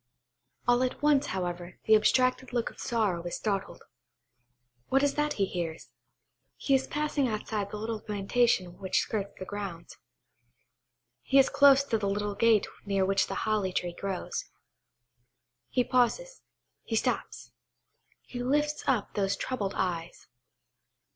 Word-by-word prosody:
All 245 Hz, 0 st, +4 dB
at 255 Hz, +3 st, -2 dB
once, 295 Hz, -2 st, +4 dB
however, 175 Hz, -1 st, -4 dB
the 220 Hz, -, +6 dB
abstracted 255 Hz, +3 st, +2 dB
look 240 Hz, -2 st, -1 dB
of -, -, -19 dB
sorrow 215 Hz, -8 st, 0 dB
is 175 Hz, 0 st, -4 dB
startled. 200 Hz, -3 st, -3 dB, 1.1 s
What 270 Hz, +1 st, +3 dB
is 285 Hz, -1 st, +2 dB
it -, -, -15 dB
that 295 Hz, 0 st, +1 dB
he 200 Hz, -, +1 dB
hears? 170 Hz, -4 st, -5 dB, 0.7 s
He 275 Hz, -, 0 dB
is 265 Hz, 0 st, +2 dB
passing 295 Hz, -2 st, 0 dB
outside 215 Hz, -2 st, -3 dB
the 210 Hz, -, -6 dB
little 220 Hz, 0 st, -4 dB
plantation 205 Hz, -3 st, 0 dB
which 190 Hz, -1 st, -1 dB
skirts 200 Hz, -2 st, -3 dB
the 185 Hz, -, -6 dB
grounds. 195 Hz, -4 st, -7 dB, 1.2 s
He 270 Hz, -, +2 dB
is 270 Hz, -, +6 dB
close 280 Hz, -1 st, +6 dB
to 230 Hz, -5 st, -1 dB
the 200 Hz, -1 st, -1 dB
little 205 Hz, +1 st, -1 dB
gate 225 Hz, 0 st, +4 dB, 0.2 s
near 195 Hz, -2 st, +1 dB
which 195 Hz, 0 st, +2 dB
the 195 Hz, -, -4 dB
holly 210 Hz, -3 st, +1 dB
tree 175 Hz, -1 st, -2 dB
grows. 195 Hz, +1 st, -4 dB, 1.2 s
He 250 Hz, -, +2 dB
pauses,–he 255 Hz, -, -2 dB
stops–he 245 Hz, +2 st, -6 dB
lifts 295 Hz, +4 st, 0 dB
up 245 Hz, -7 st, +1 dB
those 195 Hz, -2 st, 0 dB
troubled 210 Hz, -7 st, -3 dB
eyes. 170 Hz, -3 st, -3 dB
215 Hz, 140 wpm, -29 LUFS, 195-255 Hz, 1.2 s, the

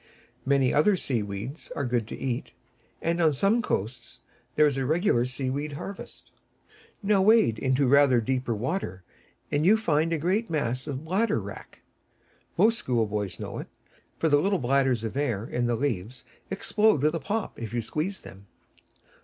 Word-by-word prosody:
Many 135 Hz, -2 st, +3 dB
other 170 Hz, +8 st, +4 dB
sea 130 Hz, -10 st, -1 dB
weeds 105 Hz, +9 st, -6 dB
are 140 Hz, -, -2 dB
good 120 Hz, -3 st, -1 dB
to -, -, -7 dB
eat, 125 Hz, -3 st, -3 dB, 0.5 s
and 170 Hz, +1 st, 0 dB
on 160 Hz, -2 st, +4 dB
some 200 Hz, -, +2 dB
coasts 120 Hz, -, -4 dB, 0.3 s
there 150 Hz, -, +5 dB
is 145 Hz, -3 st, +2 dB
a 135 Hz, -, -1 dB
regular 155 Hz, -, +2 dB
sea 130 Hz, +1 st, -3 dB
weed 145 Hz, +2 st, -3 dB
harvest. 195 Hz, +7 st, -9 dB, 0.7 s
Now 200 Hz, -1 st, +3 dB
wade 205 Hz, -, +4 dB
into 130 Hz, +1 st, +2 dB
rather 135 Hz, -1 st, +5 dB
deeper 125 Hz, 0 st, -1 dB
water, 110 Hz, -, -3 dB, 0.5 s
and 145 Hz, +1 st, +1 dB
you 205 Hz, +6 st, +5 dB
find 165 Hz, -6 st, +1 dB
a 165 Hz, -, +1 dB
great 190 Hz, +9 st, 0 dB
mass 130 Hz, -4 st, -2 dB
of 140 Hz, -3 st, -3 dB
the 140 Hz, -, -9 dB
Bladder 200 Hz, +7 st, +1 dB
Wrack. -, -, -10 dB, 0.8 s
Most 230 Hz, +1 st, +4 dB
schoolboys 105 Hz, -, -1 dB
know -, -, -5 dB
it, -, -, -7 dB, 0.5 s
for 165 Hz, -, +1 dB
the 145 Hz, -2 st, +4 dB
little 195 Hz, +2 st, +1 dB
bladders 130 Hz, -3 st, +1 dB
of 110 Hz, +1 st, -4 dB
air 120 Hz, -7 st, -1 dB
in 120 Hz, 0 st, -1 dB
the 120 Hz, -, +1 dB
leaves 120 Hz, -2 st, -3 dB, 0.2 s
explode 205 Hz, -4 st, +2 dB
with 155 Hz, +1 st, +3 dB
a 165 Hz, -, -1 dB
pop 205 Hz, +9 st, -3 dB
if 115 Hz, -3 st, -5 dB
you 120 Hz, -1 st, -2 dB
squeeze 160 Hz, -, -3 dB
them. 95 Hz, +1 st, -13 dB
140 Hz, 175 wpm, -27 LUFS, 120-170 Hz, 0.8 s, there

